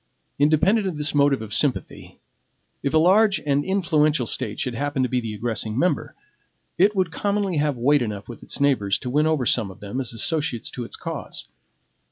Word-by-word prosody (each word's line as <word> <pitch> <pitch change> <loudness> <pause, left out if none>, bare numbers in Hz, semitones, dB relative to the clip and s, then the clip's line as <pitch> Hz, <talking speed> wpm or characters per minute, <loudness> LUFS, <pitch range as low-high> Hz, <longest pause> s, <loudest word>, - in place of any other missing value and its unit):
Independent 165 +9 +3
of 175 -5 -4
this 150 0 +1
motive 140 -4 +2
of 105 -2 -7
sympathy, 140 -4 0 0.6
if 140 - -1
a 160 - +3
large 195 +5 +4
and 145 0 +1
influential 155 -8 +1
State 110 -2 -3
should 125 - -2
happen 145 +2 -1
to 125 - 0
be 125 0 0
the 110 -2 -5
aggressing 110 0 -2
member, 160 -1 0 0.6
it 200 +4 +3
would 185 -3 0
commonly 200 -1 -1
have 145 -3 0
weight 140 +4 +3
enough 105 -4 -4
with 120 - -10
its - - -7
neighbors 125 -9 +2
to 125 - -6
win 150 +3 +2
over 155 -5 +1
some 110 -3 +3
of 95 - -13
them 105 +6 -4
as 125 - -4
associates 130 +1 -2
to 125 - -5
its - - -7
cause. - - -6
145 Hz, 195 wpm, -23 LUFS, 120-160 Hz, 0.6 s, large